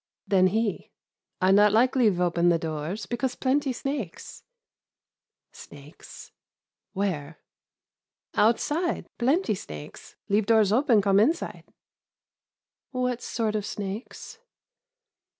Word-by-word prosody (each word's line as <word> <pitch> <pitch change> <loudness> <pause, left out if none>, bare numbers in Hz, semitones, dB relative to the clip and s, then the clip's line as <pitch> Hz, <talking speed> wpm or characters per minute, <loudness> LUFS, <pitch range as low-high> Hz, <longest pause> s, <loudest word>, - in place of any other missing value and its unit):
Then 185 -2 +4
he, 215 +2 -1 0.5
"I 185 +1 +4
not 205 +1 +6
like 245 +5 +3
leave 215 -8 +3
open 175 -1 +2
the 170 - +3
doors, 160 +5 -4
because 245 +1 -2
plenty 275 +1 0
snakes." 255 - -5 1.1
"Snakes: 145 +2 -13 0.6
where?" 165 -6 -3 1.0
"Outside, 295 +10 +1
plenty 270 - +2
snakes, 75 - -10
leave 205 +1 +1
doors 220 -3 +4
open 235 -3 +3
come 195 0 +4
inside." 315 +11 0 1.2
"What 250 -2 -2
sort 220 -2 -2
of 210 - -1
snakes?" 205 - -7
210 Hz, 100 wpm, -26 LUFS, 185-250 Hz, 1.2 s, not